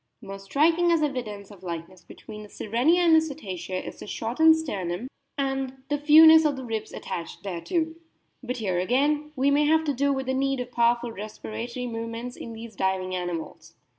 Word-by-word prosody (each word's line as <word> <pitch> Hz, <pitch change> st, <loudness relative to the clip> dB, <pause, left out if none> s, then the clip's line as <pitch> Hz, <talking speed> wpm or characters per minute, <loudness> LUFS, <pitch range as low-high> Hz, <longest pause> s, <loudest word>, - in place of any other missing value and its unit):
More 195 Hz, -3 st, -8 dB
striking 325 Hz, -, +2 dB
as 330 Hz, -2 st, +3 dB
evidence 220 Hz, -8 st, -4 dB
of 200 Hz, -3 st, -14 dB
likeness 175 Hz, +1 st, -7 dB
between 210 Hz, +4 st, -11 dB
the 210 Hz, -, -11 dB
Sirenia 250 Hz, +15 st, +1 dB
and 335 Hz, -2 st, +6 dB
the 320 Hz, -, +6 dB
Cetacea 190 Hz, -, -5 dB
is -, -, -8 dB
the -, -, -9 dB
shortened 320 Hz, +11 st, +3 dB
sternum, 200 Hz, -, -4 dB, 0.3 s
and 270 Hz, -1 st, -2 dB
the 290 Hz, 0 st, 0 dB
fewness 315 Hz, +2 st, +8 dB
of 300 Hz, -2 st, +1 dB
the 260 Hz, -1 st, -7 dB
ribs 220 Hz, -2 st, -4 dB
attached 170 Hz, +2 st, -6 dB
thereto. 320 Hz, -, -2 dB, 0.5 s
But 250 Hz, 0 st, -4 dB
here 190 Hz, -6 st, -1 dB
again 290 Hz, +9 st, +1 dB
we 275 Hz, +1 st, +2 dB
may 295 Hz, +1 st, +3 dB
have 320 Hz, +1 st, +3 dB
to 295 Hz, -2 st, 0 dB
do 280 Hz, +2 st, +1 dB
with 265 Hz, -1 st, -2 dB
the 260 Hz, -, -1 dB
need 270 Hz, 0 st, 0 dB
of 250 Hz, 0 st, -5 dB
powerful 235 Hz, 0 st, +2 dB
respiratory 225 Hz, +4 st, -6 dB
movements 230 Hz, +1 st, -5 dB
in 230 Hz, -, -8 dB
these 225 Hz, -1 st, -9 dB
diving 190 Hz, -1 st, -1 dB
animals. 175 Hz, -2 st, -5 dB
245 Hz, 185 wpm, -26 LUFS, 205-290 Hz, 0.5 s, fewness